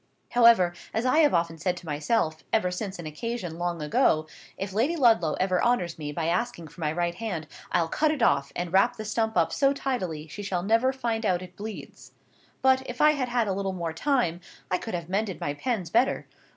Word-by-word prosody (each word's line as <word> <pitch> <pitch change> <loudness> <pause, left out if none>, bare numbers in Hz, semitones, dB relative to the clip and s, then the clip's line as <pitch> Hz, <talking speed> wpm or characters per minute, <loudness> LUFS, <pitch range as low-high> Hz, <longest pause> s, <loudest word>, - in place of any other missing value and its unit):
However, 230 -7 +6 0.2
as 225 +3 0
I 255 +5 +4
have 295 -3 +5
often 165 -1 0
said 180 +2 -1
to 175 - -10
myself, 155 +2 -1
ever 200 -5 +2
since 190 +1 -4
an 170 - -8
occasion 175 +1 -5
long 175 -2 -2
ago, 155 +1 +2 0.3
if 195 0 -4
Lady 250 - +1
Ludlow 225 - +4
ever 185 -1 +1
honours 180 -9 +1
me 150 -1 -4
by 160 +2 -3
asking 170 -1 -1
for 175 - -14
my 150 -1 0
right 170 +1 -1
hand, 180 -5 -4 0.3
I'll 170 -2 +2
cut 310 - +1
it 300 -6 0
off, 140 -9 +2
and 175 0 -3
wrap 235 +6 +4
the 215 - -6
stump 220 -1 -1
up 170 - +2
so 275 0 +3
tidily 185 - -3
she 160 +7 -8
shall 190 -3 -2
never 230 +6 +3
find 235 -4 -2
out 185 -3 +1
it 180 0 -12
bleeds. 215 0 -9 0.5
But, 260 0 +5
if 245 - -6
I 300 - +6
had 270 -4 -2
had 240 -2 +1
a 195 - 0
little 195 0 -2
more 170 -3 -3
time, 180 - 0 0.3
I 180 - +2
could 225 - -4
have 170 -2 -5
mended 195 -1 -2
my 145 - -2
pens 190 - -3
better. 245 +4 +2
190 Hz, 215 wpm, -27 LUFS, 170-235 Hz, 0.5 s, However